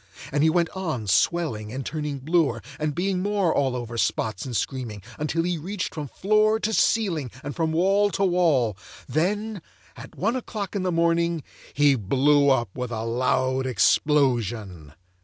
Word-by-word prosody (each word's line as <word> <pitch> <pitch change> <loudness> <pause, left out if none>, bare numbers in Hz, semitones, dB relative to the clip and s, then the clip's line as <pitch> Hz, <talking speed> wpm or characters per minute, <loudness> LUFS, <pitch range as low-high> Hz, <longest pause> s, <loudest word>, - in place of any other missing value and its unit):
And 145 +1 +1
he 160 - +5
went 170 0 +1
on 160 - -3
swelling 110 - +1
and 130 +1 -5
turning 150 -2 -3
bluer, 140 -5 +1 0.2
and 150 -2 -1
being 185 0 0
more 200 -4 +1
all 135 -3 +1
over 120 -1 -4
spots 110 0 -1
and 120 -4 -2
screaming, 120 -7 -4 0.2
until 155 +2 0
he 175 -1 -1
reached 185 +4 -4
from 150 -2 -5
floor 215 - +2
to 220 0 -1
ceiling 180 - +1
and 145 0 -5
from 160 -1 0
wall 195 +5 +3
to 195 - +1
wall; 160 - +2 0.3
and 125 - -10
then, 205 +5 0 0.3
at - - -11
one 225 +7 0
o'clock 215 -6 -5
in 200 - 0
the 185 0 0
morning, 170 -1 +1 0.3
he 145 -1 +4
blew 135 +6 +3
up 120 -7 +1
with 125 -1 -4
a 110 -2 -4
loud 130 +2 0
explosion. 115 - +1
150 Hz, 170 wpm, -25 LUFS, 125-180 Hz, 0.3 s, he